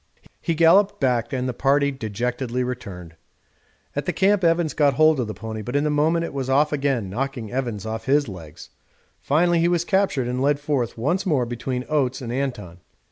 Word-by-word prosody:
He 165 Hz, -, -1 dB
galloped 170 Hz, +5 st, +4 dB
back 120 Hz, -4 st, 0 dB
and 130 Hz, -1 st, -2 dB
the 125 Hz, -, -2 dB
party 140 Hz, +3 st, +2 dB
dejectedly 125 Hz, +1 st, -3 dB
returned. 100 Hz, -9 st, -6 dB, 0.8 s
At -, -, -3 dB
the -, -, +2 dB
camp 195 Hz, 0 st, +2 dB
Evans 165 Hz, -2 st, +2 dB
got 145 Hz, -3 st, +2 dB
hold 155 Hz, 0 st, +4 dB
of 120 Hz, -, -1 dB
the 110 Hz, -, -6 dB
pony, 110 Hz, -1 st, -6 dB
but 125 Hz, +6 st, -5 dB
in 145 Hz, +1 st, +2 dB
a 150 Hz, -, +1 dB
moment 160 Hz, +3 st, +2 dB
it -, -, -7 dB
was 135 Hz, -2 st, -3 dB
off 150 Hz, +3 st, +3 dB
again, 135 Hz, -7 st, 0 dB
knocking 120 Hz, +2 st, -4 dB
Evans 120 Hz, -6 st, -3 dB
off 110 Hz, 0 st, -5 dB
his 145 Hz, +1 st, +2 dB
legs. 85 Hz, -7 st, -10 dB, 0.5 s
Finally 170 Hz, +4 st, +2 dB
he 170 Hz, -, +3 dB
was 175 Hz, -1 st, +1 dB
captured 190 Hz, -11 st, +1 dB
and 125 Hz, +1 st, -2 dB
led 145 Hz, +1 st, +2 dB
forth 140 Hz, -6 st, -2 dB
once 160 Hz, -, 0 dB
more 140 Hz, -8 st, +2 dB
between 125 Hz, +2 st, -4 dB
Oates 135 Hz, -4 st, 0 dB
and 120 Hz, -2 st, -5 dB
Anton. 120 Hz, -10 st, -4 dB
135 Hz, 195 wpm, -23 LUFS, 120-150 Hz, 0.8 s, galloped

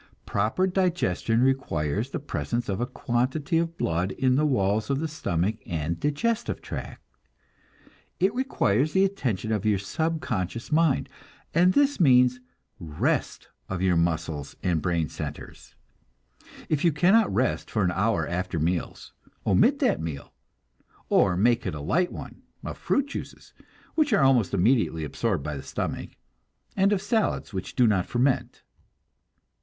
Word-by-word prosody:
Proper 110 Hz, -, 0 dB
digestion 175 Hz, -, +1 dB
requires 110 Hz, -, 0 dB
the -, -, -4 dB
presence 120 Hz, -5 st, -3 dB
of 100 Hz, +3 st, -2 dB
a 120 Hz, -, 0 dB
quantity 130 Hz, +8 st, -1 dB
of 165 Hz, 0 st, -2 dB
blood 85 Hz, +3 st, -1 dB
in 130 Hz, -1 st, +1 dB
the 150 Hz, +2 st, +3 dB
walls 105 Hz, -4 st, +1 dB
of 140 Hz, 0 st, +1 dB
the 160 Hz, -, -1 dB
stomach 105 Hz, -, -1 dB
and 85 Hz, 0 st, -2 dB
digestive 220 Hz, +12 st, -1 dB
tract. -, -, -7 dB, 1.2 s
It 190 Hz, +3 st, +2 dB
requires 155 Hz, -, +1 dB
the 190 Hz, +1 st, +4 dB
attention 120 Hz, -, -2 dB
of 105 Hz, -2 st, 0 dB
your 105 Hz, -2 st, +2 dB
subconscious 115 Hz, -, -3 dB
mind, 155 Hz, -3 st, +2 dB, 0.5 s
and 180 Hz, +3 st, +4 dB
this 285 Hz, 0 st, +2 dB
means 125 Hz, -5 st, +5 dB, 0.4 s
rest 80 Hz, -4 st, -2 dB, 0.2 s
of 95 Hz, -, -3 dB
muscles 85 Hz, -5 st, 0 dB
and 85 Hz, -4 st, +1 dB
brain 85 Hz, -3 st, 0 dB
centers. -, -, -8 dB, 0.9 s
If 150 Hz, -2 st, 0 dB
you 170 Hz, -, +4 dB
cannot 190 Hz, +9 st, +4 dB
rest 120 Hz, +6 st, 0 dB
for 105 Hz, -, 0 dB
an 90 Hz, -, +2 dB
hour 95 Hz, -4 st, 0 dB
after 90 Hz, 0 st, -3 dB
meals, 85 Hz, +3 st, -2 dB, 0.3 s
omit -, -, +4 dB
that -, -, +2 dB
meal, 80 Hz, -4 st, -6 dB, 0.8 s
or 90 Hz, -2 st, +3 dB
make 120 Hz, +4 st, +2 dB
it -, -, -3 dB
a -, -, -6 dB
light 175 Hz, -, 0 dB
one, -, -, -9 dB, 0.2 s
of -, -, -4 dB
fruit 280 Hz, -, +1 dB
juices, 280 Hz, -, -8 dB, 0.4 s
which 300 Hz, -6 st, +2 dB
are 180 Hz, -, +4 dB
almost 130 Hz, -7 st, +4 dB
immediately 100 Hz, -4 st, +2 dB
absorbed 90 Hz, +1 st, -2 dB
by 75 Hz, 0 st, -4 dB
the 70 Hz, -, -5 dB
stomach, -, -, -5 dB, 0.6 s
and 195 Hz, +1 st, +3 dB
of 200 Hz, -1 st, 0 dB
salads, 220 Hz, -, 0 dB
which 95 Hz, -1 st, -5 dB
do 125 Hz, -, +4 dB
not 100 Hz, -4 st, +2 dB
ferment. 125 Hz, +2 st, 0 dB
120 Hz, 145 wpm, -26 LUFS, -, 1.2 s, means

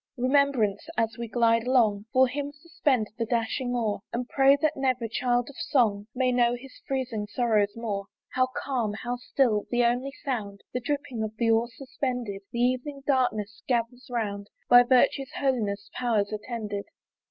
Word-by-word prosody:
Remembrance! 260 Hz, -1 st, +2 dB
as 225 Hz, 0 st, +1 dB
we 235 Hz, -, -3 dB
glide 230 Hz, 0 st, +2 dB
along, 220 Hz, -6 st, +3 dB
For 260 Hz, 0 st, +5 dB
him 285 Hz, +2 st, -4 dB
suspend 290 Hz, -7 st, -1 dB
the 230 Hz, -, +1 dB
dashing 245 Hz, +2 st, -1 dB
oar, 220 Hz, -4 st, -1 dB
And 245 Hz, +1 st, -3 dB
pray 275 Hz, +1 st, +5 dB
that 310 Hz, +1 st, +1 dB
never 255 Hz, -3 st, 0 dB
child 245 Hz, +1 st, 0 dB
of 280 Hz, -, -11 dB
Song 210 Hz, -6 st, +1 dB
May 255 Hz, 0 st, +2 dB
know 245 Hz, -1 st, +3 dB
his 255 Hz, +2 st, -12 dB
freezing 250 Hz, -6 st, -2 dB
sorrows 210 Hz, -2 st, +1 dB
more. 205 Hz, -4 st, -3 dB, 0.3 s
How 255 Hz, 0 st, +3 dB
calm! 240 Hz, -6 st, -1 dB
how 245 Hz, 0 st, -2 dB
still! 245 Hz, -4 st, +1 dB
the 240 Hz, 0 st, +2 dB
only 250 Hz, +3 st, 0 dB
sound, 205 Hz, -7 st, -3 dB
The 250 Hz, -, 0 dB
dripping 255 Hz, -3 st, -3 dB
of 220 Hz, 0 st, -4 dB
the 230 Hz, 0 st, +2 dB
oar 225 Hz, +1 st, +3 dB
suspended! 250 Hz, -6 st, -3 dB
The -, -, -5 dB
evening 255 Hz, +3 st, -1 dB
darkness 220 Hz, -6 st, 0 dB
gathers 245 Hz, +1 st, -1 dB
round 205 Hz, -4 st, -3 dB, 0.2 s
By 245 Hz, 0 st, +9 dB
virtue's 260 Hz, +2 st, +3 dB
holiest 215 Hz, -7 st, -1 dB
powers 220 Hz, -5 st, 0 dB
attended. 210 Hz, -2 st, -4 dB
245 Hz, 165 wpm, -27 LUFS, 220-260 Hz, 0.3 s, By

